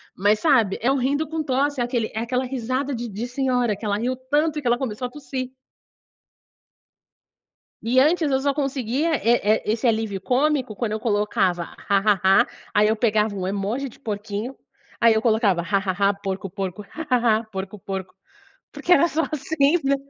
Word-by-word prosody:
Mas 205 +3 +2
sabe, 230 - +3
é 245 +4 +2
um 275 - +1
"rindo 285 +5 0
com 320 +1 -3
tosse", 280 0 0
é - - +3
aquele 240 -2 -2
é 220 - -3
aquela 250 +3 -1
risada 260 +2 -2
de 235 0 -5
de 215 +4 -4
senhora, 250 -3 0
que 200 - -16
ela 205 -1 0
riu 245 +4 -1
tanto 295 +4 0
e - - -7
que 255 - -3
ela 240 - +3
começou 250 -1 -3
a - - -13
tossir. 260 -2 -5 2.3
E 245 +3 +2
antes 310 +3 +3
eu 265 -1 +2
só 280 0 +1
conseguia, 275 +1 -1
eh 235 -1 +2
eh, 215 +2 +2
esse 230 +3 0
alívio 220 -3 0
cômico 260 +1 0
quando 225 0 -2
eu 215 - -2
colocava: 205 -5 +1 0.2
"Ha 200 - +4
ha 200 0 +2 0.2
ha", - - -1 0.3
aí 210 +1 +4
eu 220 - +2
pegava 215 -2 +1
um 185 -1 -3
emoji 205 +8 -2
de 250 - -13
porquinho, 210 +1 -4 0.5
aí 230 -1 +5
eu 220 - +1
colocava: 220 -6 +2
"Ha 170 +4 0
ha 190 -1 -2 0.2
ha, - - +1
porco, 195 -1 -5
porco, 195 +1 -5
ha 320 +1 -6
ha 240 -3 +3
ha, 225 - -5
porco, 195 -1 -7
porco", 190 0 -6 0.6
porque 360 - +2
era 340 -1 +5
só 320 +1 0
assim, 295 +2 +2
né. 275 +1 +3
235 Hz, 195 wpm, -23 LUFS, 210-270 Hz, 2.3 s, aí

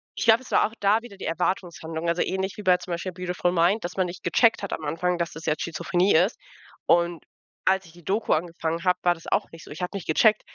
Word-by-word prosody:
Ich - - -2
glaube, 230 +2 +6
es - - -13
war - - +4
auch 220 - -15
da 210 +3 +3
wieder 220 -5 -11
die - - -7
Erwartungshaltung, 165 -1 -2
also 170 - +1
ähnlich 190 +1 -2
wie 210 - -7
bei 185 -1 +5
zum 180 - -9
Beispiel 180 +2 -4
„Beautiful 180 -1 -1
Mind“, 180 +6 +2
dass 175 - -5
man 185 -1 +1
nicht 180 +1 -9
gecheckt 230 -2 +3
hat 200 - -3
am 155 - -5
Anfang, 170 +4 -1
dass 170 -1 -2
das 160 +1 -9
jetzt 155 -1 0
Schizophrenie 175 +3 +1
ist. 180 +8 +3 0.5
Und 170 -1 +2 0.4
als 190 0 +2
ich 165 - -16
die 175 -1 -17
Doku 205 +6 0
angefangen 165 0 -2
habe, 180 -1 +2
war 175 0 +4
das 165 - -14
auch - - 0
nicht 165 0 -12
so. - - -13
Ich 155 +5 -8
habe 180 +3 -3
nicht 190 - -6
gecheckt: 215 +7 +4
180 Hz, 255 wpm, -25 LUFS, 165-190 Hz, 0.5 s, glaube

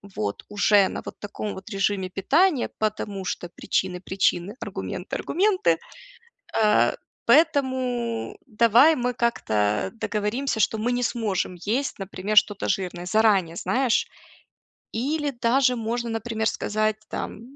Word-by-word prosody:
вот 105 -1 -3
уже 205 -1 +4
на - - -5
вот - - -8
таком 205 0 -5
вот 190 +3 -10
режиме 195 -2 -1
питания, 285 - +2
потому 210 -2 -2
что 175 -1 -4
причины 180 +1 -2
причины, 190 +1 0
аргументы - - -5
аргументы. 370 - +2 0.8
А, 210 -1 +3 0.3
поэтому 260 -7 +1
давай 235 +7 +5
мы 250 -1 -1
как-то 105 - 0
договоримся, 220 +3 -2
что 220 - +2
мы 240 +3 0
не 245 0 0
сможем 210 -7 -1
есть, 255 +4 -1
например, 195 +2 -3
что-то 205 -1 +4
жирное." 180 -2 -2
Заранее, 195 -4 +2
знаешь? 255 +2 +1 0.9
Или 290 +5 -1
даже 250 +1 +2
можно, 235 +1 -2
например, 225 0 -2
сказать 215 +1 0
там, - - -5
220 Hz, 125 wpm, -24 LUFS, 195-245 Hz, 0.9 s, давай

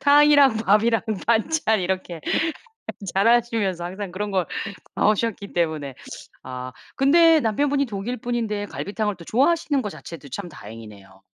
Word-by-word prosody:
탕이랑 285 -4 +6
밥이랑 225 +1 +3 0.2
반찬 230 0 +2
이렇게 185 -2 -3 0.9
자라시면서 225 -3 +2
항상 190 +2 -6
그런 205 +3 -4
거 185 -3 +1 0.5
나오셨기 210 -1 0
때문에 155 -6 -1 0.5
아 130 0 -6 0.2
근데 325 +4 +5
남편분이 280 +4 +1
독일 220 +4 -4
분인데 220 -3 -2
갈비탕을 210 +1 -3
또 170 - -13
좋아하시는 285 - +2
거 210 - -4
자체도 160 -7 -10
참 180 +8 -6
다행이네요. 105 - -12
210 Hz, 315 characters per minute, -23 LUFS, 175-240 Hz, 0.9 s, 탕이랑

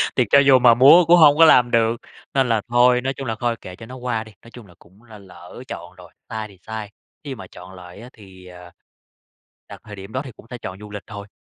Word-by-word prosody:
thì 125 - +2
cho 140 - +6
dù 135 -2 +5
mà 120 -1 +5
muốn 145 +9 +6
cũng 175 +1 +6
hông 150 -3 +5
có 165 - +7
làm 125 -5 +4
được. 115 0 +1 0.4
Nên 135 -3 +1
là 110 -2 0
thôi, 125 +1 +3
nói 135 +2 -3
chung 135 -2 -8
là 110 - -3
thôi 120 -1 -1
kệ 90 - -11
cho 115 - -13
nó 130 +2 -11
qua 120 -3 -4
đi. 110 - -16
Nói 115 - -16
chung 120 -5 -14
là 90 - -19
cũng 95 +6 -24
là 110 -3 -15
lỡ 90 +4 -14
chọn 90 +1 -10
rồi, 90 -2 -17 0.2
sai 110 -2 -6
thì 100 -2 -19
sai, 110 -2 -7 0.3
khi 135 -3 -7
mà 95 - -12
chọn 90 +1 -14
lại 90 +2 -13
á 125 - -12
thì, 95 -3 -17
ờ, 90 -1 -14 1.0
đặt - - -12
thời 105 -2 -11
điểm 95 +2 -12
đó 130 - -3
thì 130 - -9
cũng 110 - -19
sẽ 125 - -7
chọn 95 -4 -9
du 105 0 -12
lịch 105 -1 -8
thôi. 100 -1 -10
115 Hz, 270 wpm, -20 LUFS, 95-125 Hz, 1.0 s, có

